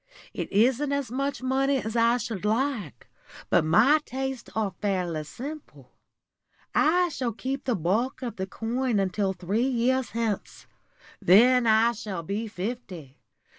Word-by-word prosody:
It -, -, -5 dB
isn't 255 Hz, +7 st, +2 dB
as 280 Hz, -4 st, -2 dB
much 275 Hz, +1 st, -2 dB
money 270 Hz, +1 st, +1 dB
as 220 Hz, -2 st, -4 dB
I 235 Hz, +1 st, +4 dB
should 220 Hz, -6 st, -5 dB
like, 220 Hz, -, -1 dB, 0.4 s
but -, -, +4 dB
my 230 Hz, -, +5 dB
tastes 265 Hz, -2 st, -5 dB
are 215 Hz, -3 st, -1 dB
fairly 180 Hz, -6 st, -1 dB
simple. 280 Hz, -, -9 dB, 0.8 s
I 355 Hz, +3 st, +3 dB
shall 250 Hz, -7 st, -3 dB
keep 265 Hz, +4 st, -4 dB
the 250 Hz, -, +1 dB
bulk 215 Hz, -, -1 dB
of 240 Hz, -4 st, -5 dB
the 190 Hz, 0 st, -3 dB
coin 235 Hz, +3 st, -1 dB
until 195 Hz, 0 st, 0 dB
three 195 Hz, +7 st, -1 dB
years 255 Hz, 0 st, +1 dB
hence. 225 Hz, -3 st, -3 dB, 0.6 s
Then 240 Hz, +6 st, +6 dB
I 220 Hz, +1 st, +5 dB
shall 200 Hz, -6 st, -6 dB
be 205 Hz, +7 st, -3 dB
fifty. 185 Hz, -, -6 dB
230 Hz, 140 wpm, -26 LUFS, 200-260 Hz, 0.8 s, Then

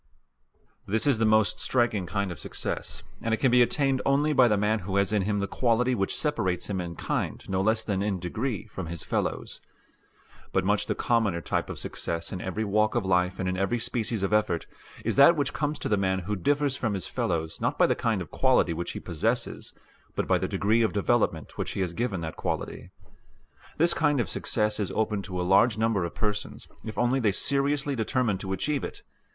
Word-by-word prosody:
This 110 Hz, +6 st, +1 dB
is 135 Hz, -6 st, +3 dB
the 115 Hz, -, +3 dB
most 110 Hz, -1 st, +3 dB
striking 115 Hz, -7 st, +1 dB
kind 100 Hz, +1 st, -1 dB
of 85 Hz, -, -8 dB
success, -, -, -4 dB, 0.2 s
and 115 Hz, -1 st, +1 dB
it -, -, -12 dB
can 130 Hz, -, +3 dB
be 125 Hz, 0 st, +6 dB
attained 135 Hz, +1 st, +2 dB
only 145 Hz, +2 st, +2 dB
by 130 Hz, -3 st, +6 dB
the 105 Hz, -3 st, +2 dB
man 105 Hz, +2 st, +1 dB
who 95 Hz, 0 st, -4 dB
has 100 Hz, +1 st, +2 dB
in 105 Hz, -, +3 dB
him 105 Hz, +2 st, 0 dB
the 100 Hz, -, 0 dB
quality 125 Hz, +3 st, +1 dB
which 95 Hz, -5 st, -1 dB
separates 105 Hz, -, -1 dB
him 95 Hz, -2 st, -1 dB
in 85 Hz, -1 st, -6 dB
kind -, -, -3 dB
no 95 Hz, 0 st, 0 dB
less 110 Hz, +2 st, +2 dB
than 100 Hz, -3 st, -1 dB
in 100 Hz, -1 st, 0 dB
degree 105 Hz, +6 st, -3 dB
from 95 Hz, -5 st, -7 dB
his 85 Hz, -1 st, -5 dB
fellows. -, -, -2 dB, 0.9 s
But 95 Hz, -1 st, +1 dB
much 105 Hz, +1 st, +1 dB
the -, -, 0 dB
commoner 110 Hz, -7 st, +1 dB
type -, -, -2 dB
of -, -, -5 dB
success 85 Hz, 0 st, -3 dB
in 90 Hz, -, -4 dB
every 95 Hz, +4 st, -2 dB
walk 105 Hz, +2 st, +1 dB
of 120 Hz, -5 st, 0 dB
life 90 Hz, 0 st, +1 dB
and 95 Hz, -, -2 dB
in 90 Hz, -, 0 dB
every 95 Hz, +5 st, 0 dB
species 115 Hz, -2 st, -1 dB
of 95 Hz, -, 0 dB
effort 105 Hz, -6 st, +1 dB, 0.4 s
is -, -, 0 dB
that 140 Hz, +5 st, +8 dB
which 145 Hz, -2 st, -1 dB
comes 150 Hz, 0 st, -1 dB
to -, -, -4 dB
the 105 Hz, -, +2 dB
man 95 Hz, -1 st, +1 dB
who 105 Hz, +4 st, -2 dB
differs 140 Hz, +7 st, +1 dB
from 110 Hz, -5 st, -1 dB
his 95 Hz, -, -2 dB
fellows 80 Hz, -2 st, -2 dB
not -, -, 0 dB
by -, -, +5 dB
the -, -, +3 dB
kind -, -, -1 dB
of -, -, -15 dB
quality 85 Hz, -, +3 dB
which 85 Hz, +1 st, -4 dB
he -, -, -5 dB
possesses 85 Hz, -4 st, -2 dB, 0.4 s
but -, -, -1 dB
by -, -, +3 dB
the -, -, -1 dB
degree 110 Hz, +3 st, +2 dB
of 110 Hz, -6 st, +1 dB
development 100 Hz, -7 st, 0 dB
which -, -, -2 dB
he -, -, -2 dB
has 90 Hz, -3 st, -1 dB
given 110 Hz, -4 st, -2 dB
that 80 Hz, -1 st, -5 dB
quality. -, -, -4 dB, 0.9 s
This 170 Hz, +2 st, +4 dB
kind 150 Hz, -3 st, +2 dB
of 115 Hz, -, 0 dB
success 105 Hz, +4 st, 0 dB
is 100 Hz, -, -1 dB
open 105 Hz, -2 st, 0 dB
to 95 Hz, -2 st, -5 dB
a -, -, 0 dB
large 105 Hz, +4 st, +4 dB
number 110 Hz, -4 st, +1 dB
of 85 Hz, -, -6 dB
persons, 105 Hz, -1 st, -3 dB, 0.2 s
if 110 Hz, -, -7 dB
only 120 Hz, +2 st, +2 dB
they 110 Hz, -5 st, +2 dB
seriously 140 Hz, +5 st, +1 dB
determine 110 Hz, -3 st, 0 dB
to 95 Hz, 0 st, -5 dB
achieve 140 Hz, +9 st, -1 dB
it. -, -, -6 dB
105 Hz, 220 wpm, -27 LUFS, 95-120 Hz, 0.9 s, that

